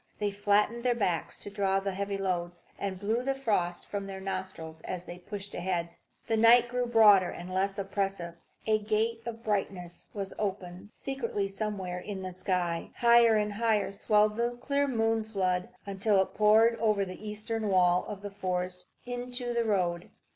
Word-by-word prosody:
They 205 -1 -1
flattened 205 +3 +1
their 245 -1 +2
backs 180 -7 -1
to 205 - -8
draw 195 -1 +1
the 195 0 -2
heavy 200 +1 -3
loads, 175 -2 -3
and 195 -2 -3
blew 220 +5 0
the 270 +1 0
frost 195 -9 -1
from 200 -1 -4
their 195 -1 -6
nostrils 185 -4 -5
as 180 +1 -5
they 175 0 -9
pushed 200 +2 -7
ahead. 175 -1 -2 0.4
The 225 - +1
night 235 +2 +7
grew 250 0 -1
broader 210 -6 +6
and 180 +1 -7
less 195 +1 0
oppressive. 195 -3 -2 0.3
A 215 -1 +3
gate 220 +2 0
of 230 0 -6
brightness 195 -4 -3
was 195 -2 -5
opened 190 -1 -4
secretly 230 -7 -3
somewhere 195 -3 -4
in 190 0 -6
the 185 -1 -5
sky; 175 -2 -1
higher 235 -1 +6
and 210 -1 0
higher 215 -2 +1
swelled 210 +1 +2
the 240 +1 0
clear 280 +2 0
moon 225 -3 +1
flood, 185 -4 -1 0.2
until 200 +1 +2
it 190 - 0
poured 220 +2 +5
over 210 -3 +2
the 190 +3 -7
eastern 215 +1 -3
wall 180 -2 +4
of 205 -1 -7
forest 180 -1 -3 0.2
into 245 0 -4
the 235 -1 +1
road. 180 -5 0
200 Hz, 170 wpm, -29 LUFS, 185-225 Hz, 0.4 s, night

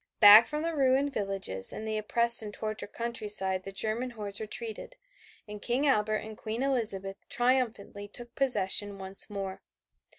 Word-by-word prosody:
Back 210 +1 +9
from 300 +1 -4
the 330 0 -3
ruined 275 0 +1
villages 195 - 0
and 220 - -7
the 220 - -3
oppressed 235 +2 +4
and 210 -1 -7
tortured 215 -1 -6
countryside 210 -5 +2
the 195 - -7
German 220 +5 -2
hordes 210 -3 -4
retreated, 220 - -6 0.5
and 210 0 -9
King 250 +4 0
Albert 215 -6 +1
and 220 0 -9
Queen 220 +4 -5
Elizabeth 210 -8 -1
triumphantly 240 -5 -1
took 240 +3 -9
possession 205 -5 +1
once 190 +2 0
more. 195 -2 -6
215 Hz, 155 wpm, -28 LUFS, 200-240 Hz, 0.5 s, Back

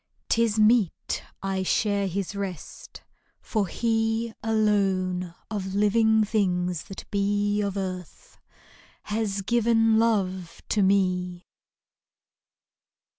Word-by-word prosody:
'T 230 - +3
is 220 -2 0
meet 215 -4 +2 0.2
I 195 -1 -1
share 200 +1 +1
his 195 +2 -3
rest, 190 -5 -7 0.4
for 210 -4 -1
he, 225 +2 0
Alone 195 -5 0 0.2
of 195 -2 -3
living 220 +1 +3
things 180 -5 0
that 195 - -9
be 205 +1 +1
Of 200 -1 -2
earth, 185 - -6 0.6
has 210 -2 -2
given 225 0 +3
love 190 -6 -1
to 210 - +2
me. 185 -2 +1
200 Hz, 100 wpm, -26 LUFS, 185-220 Hz, 0.6 s, T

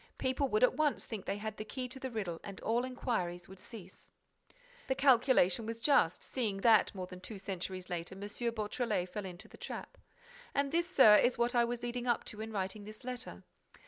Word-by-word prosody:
People 260 +2 +1
would 430 +3 +2
at - - +6
once 305 -2 +1
think 210 -4 -6
that - - -1
they - - -5
had 215 +1 -5
the - - -4
key 255 +4 -5
to 255 +2 -7
the 260 - -4
riddle 195 -8 -3
and 200 -2 -8
all 235 +2 +1
enquiries 180 -9 -2
would 190 0 -12
cease. 190 -3 -11 0.8
The 265 - +1
calculation 240 -7 +4
was 230 0 -4
just, 230 - +3
seeing 210 -7 -2
that, 220 -3 +5
more 185 -1 -4
than 180 0 -10
two 210 +2 -7
centuries 185 -1 -5
later, 175 0 -4
M. 195 - -10
Beautrelet 215 -2 -2
fell 210 +1 -5
into 185 +4 -8
the - - -14
trap. - - -7 0.6
And 280 0 +1
this, 340 +2 +1
Sir, 220 - +8
is 245 +3 +3
what 240 +1 +1
I 240 -1 +4
was 240 0 -4
leading 245 +1 -3
up 240 - +2
to 210 - -8
in 220 0 -5
writing 200 0 -3
this 215 +3 -10
letter. 250 -1 -6
220 Hz, 210 wpm, -33 LUFS, 195-250 Hz, 0.8 s, Sir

